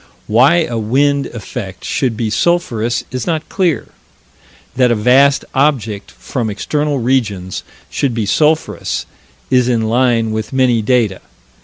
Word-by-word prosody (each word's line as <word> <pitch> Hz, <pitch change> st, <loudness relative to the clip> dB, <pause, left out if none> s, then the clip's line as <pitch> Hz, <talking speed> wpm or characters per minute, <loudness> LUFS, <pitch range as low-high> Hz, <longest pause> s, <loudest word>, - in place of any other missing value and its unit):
Why 135 Hz, +10 st, +4 dB
a 120 Hz, -7 st, -3 dB
wind 140 Hz, +6 st, +1 dB
effect 105 Hz, -4 st, -7 dB
should 125 Hz, -5 st, -1 dB
be 110 Hz, -2 st, -2 dB
sulphurous 120 Hz, -5 st, 0 dB
is 130 Hz, -2 st, -4 dB
not 160 Hz, -2 st, -1 dB
clear. 180 Hz, -5 st, 0 dB, 0.9 s
That 125 Hz, -1 st, +3 dB
a 120 Hz, -, +2 dB
vast 135 Hz, +6 st, +4 dB
object 120 Hz, -8 st, 0 dB
from 120 Hz, -4 st, -4 dB
external 145 Hz, +8 st, -1 dB
regions 110 Hz, -8 st, -1 dB, 0.3 s
should 135 Hz, -5 st, -1 dB
be 110 Hz, -3 st, -1 dB
sulphurous 155 Hz, +9 st, 0 dB, 0.5 s
is 125 Hz, -1 st, +3 dB
in 115 Hz, -2 st, +1 dB
line 115 Hz, -1 st, +1 dB
with 110 Hz, +2 st, -4 dB
many 125 Hz, -3 st, +2 dB
data. 110 Hz, -4 st, +1 dB
125 Hz, 135 wpm, -16 LUFS, 110-140 Hz, 0.9 s, Why